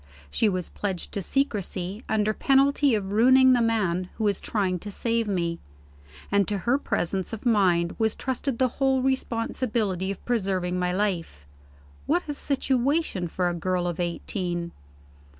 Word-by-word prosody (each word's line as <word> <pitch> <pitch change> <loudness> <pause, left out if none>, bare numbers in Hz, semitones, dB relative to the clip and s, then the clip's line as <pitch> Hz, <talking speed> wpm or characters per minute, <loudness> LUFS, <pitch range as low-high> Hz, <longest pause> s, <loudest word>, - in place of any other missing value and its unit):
She 220 - +2
was 185 -3 -1
pledged 190 -4 -4
to 200 - -3
secrecy, 205 -4 -2
under 215 0 +1
penalty 275 +1 +3
of 195 -2 -3
ruining 260 +4 +6
the 245 - +3
man 190 -6 0
who 220 - -4
was 205 -2 +1
trying 190 -4 -1
to 205 - -7
save 230 +2 0
me; 170 -4 -1 0.7
and 200 -1 +3
to 205 - -1
her 255 +4 +3
presence 190 - -2
of 225 - -6
mind 180 -7 +3
was 220 -1 +1
trusted 260 0 -2
the 260 - +3
whole 265 -1 +2
responsibility 230 -6 -1
of 195 - -6
preserving 190 -6 0
my 180 0 0
life. 180 - -2 0.6
What 345 +4 +2
a 295 - -2
situation 275 - 0
for 180 +2 -1
a 175 - 0
girl 180 +1 -1
of 175 0 -3
eighteen! 175 0 -3
205 Hz, 155 wpm, -26 LUFS, 180-245 Hz, 0.7 s, ruining